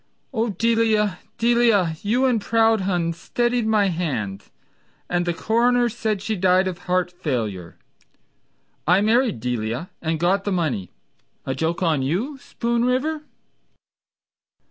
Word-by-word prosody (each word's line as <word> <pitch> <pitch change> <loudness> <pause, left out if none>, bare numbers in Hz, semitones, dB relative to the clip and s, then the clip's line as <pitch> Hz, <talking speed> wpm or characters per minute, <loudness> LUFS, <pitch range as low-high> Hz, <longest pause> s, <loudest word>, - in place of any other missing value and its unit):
— - - -46
Oh 230 -1 0
Delia, 215 -2 +1 0.2
Delia, 230 -8 +3
you 240 +6 +1
and 245 -4 +2
Proudhon 200 -7 +2
Steadied 240 +6 -1
my 210 -3 +3
hand, 120 - -3 0.6
and 175 0 -1
the - - +2
coroner 240 +4 +2
Said 215 -3 -2
she 220 +1 -1
died 185 0 +3
of 180 -2 -4
heart 180 0 +1
failure. 115 - -4 1.1
I 180 +3 +5
married 225 - +2
Delia 120 +5 -3
and 160 -1 -1
got 190 +4 +2
the 205 - -2
money— 140 - -1 0.6
A 130 - -1
joke 160 +6 -1
on 160 -5 +2
you, 210 - -2
Spoon 235 -1 -2
River? 275 +5 0
195 Hz, 130 wpm, -22 LUFS, 165-230 Hz, 1.1 s, I